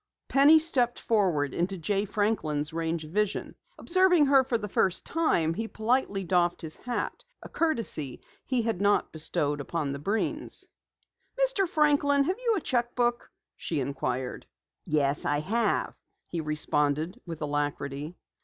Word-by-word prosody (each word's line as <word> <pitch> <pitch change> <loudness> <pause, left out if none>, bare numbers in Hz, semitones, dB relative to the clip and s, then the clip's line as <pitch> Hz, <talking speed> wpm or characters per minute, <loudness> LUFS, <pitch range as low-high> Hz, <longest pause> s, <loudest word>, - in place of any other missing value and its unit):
Penny 285 +3 +7
stepped 265 -7 +1
forward 175 - +1
into 190 +3 -1
Jay 200 +4 -1
Franklin's 185 -8 -1
range 165 0 -2
of 155 - -12
vision. 210 +1 -1 0.2
Observing 360 -3 +4
her 270 -1 +5
for 250 -2 0
the 210 -2 -5
first 190 -2 0
time, 175 - +1
he 225 +6 -3
politely 220 -3 0
doffed 175 -1 +1
his 160 -1 -6
hat, 245 0 -4 0.2
a - - -8
courtesy 230 - -1 0.2
he 250 -3 0
had 220 -5 -1
not 205 0 +2
bestowed 145 -2 -1
upon 150 -1 -2
the 140 - -4
Breens. 205 +9 -2 0.7
"Mr. - - +2
Franklin, 285 -2 +3
have 370 - -1
you 470 -3 +1
a 380 - -1
cheque 240 -3 -1
book?" 240 -1 0 0.3
she 160 - -3
inquired. 130 -2 -3 0.4
"Yes, 145 -1 +1
I 145 0 +1
have," 225 +8 0 0.3
he 170 - -4
responded 150 +1 0
with 165 -2 -6
alacrity. 145 +1 -3
195 Hz, 145 wpm, -28 LUFS, 150-250 Hz, 0.7 s, Penny